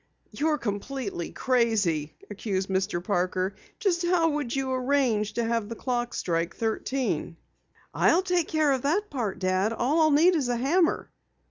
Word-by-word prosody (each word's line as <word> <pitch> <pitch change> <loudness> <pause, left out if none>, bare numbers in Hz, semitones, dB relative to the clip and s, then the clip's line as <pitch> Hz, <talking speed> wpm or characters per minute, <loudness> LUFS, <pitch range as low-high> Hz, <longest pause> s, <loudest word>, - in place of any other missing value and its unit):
"You're 305 0 0
completely 205 - -4
crazy!" 210 - +1 0.2
accused 195 -2 -2
Mr. 190 -2 -1
Parker. 185 0 0 0.2
"Just 365 -6 0
how 345 -2 +3
would 290 -5 -2
you 265 -1 -1
arrange 250 -5 +1
to 235 - -1
have 230 -2 -1
the 230 - -5
clock 240 0 -2
strike 170 0 -1
thirteen?" 225 - -2 0.6
"I'll 355 +3 +3
take 360 -3 +1
care 310 -2 +2
of 265 -2 +1
that 375 +10 0
part, 230 -9 -2
Dad. 185 +3 +1
All 280 +8 +1
I'll 310 - +5
need 320 +5 +5
is 275 -6 0
a 245 - +1
hammer." 325 +8 +1
240 Hz, 155 wpm, -27 LUFS, 200-295 Hz, 0.6 s, I'll